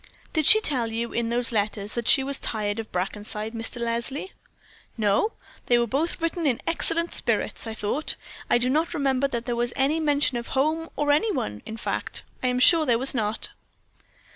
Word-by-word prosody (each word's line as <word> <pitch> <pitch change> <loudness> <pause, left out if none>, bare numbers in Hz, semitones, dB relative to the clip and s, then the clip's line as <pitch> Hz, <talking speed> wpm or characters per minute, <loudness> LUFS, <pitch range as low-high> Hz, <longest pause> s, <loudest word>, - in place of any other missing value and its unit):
"Did 310 -3 +1
she 435 - +10
tell 245 - +1
you, 230 +1 -3
in 235 -1 -1
those 240 +1 +1
letters, 205 -1 -1
that 235 -2 -3
she 270 - +6
was 275 0 0
tired 210 -1 -2
of 225 - -7
Brackenside, 210 +4 -4
Mr. 230 +2 -4
Leslie?" 235 +9 -2 0.7
"No, 215 - +1 0.3
they 240 - +4
were 240 - +2
both 285 +9 -1
written 330 -1 -1
in 245 -4 +1
excellent 335 0 +1
spirits, - - -1
I 220 - -5
thought. 220 +9 -2 0.3
I - - +5
do 240 +1 +1
not 310 +6 0
remember 275 -2 +1
that 240 -3 -4
there 240 -1 -2
was 240 0 -1
any 285 +4 +1
mention 290 -4 +2
of 235 - -5
home 315 +4 +1
or 295 0 +1
any 420 +10 +2
one; 105 - -3
in 220 - -6
fact, - - -3 0.2
I 255 - 0
am 250 0 +1
sure 310 +4 +6
there 235 -2 +4
was 265 +3 +1
not." 220 -3 -1
245 Hz, 195 wpm, -25 LUFS, 225-295 Hz, 0.7 s, she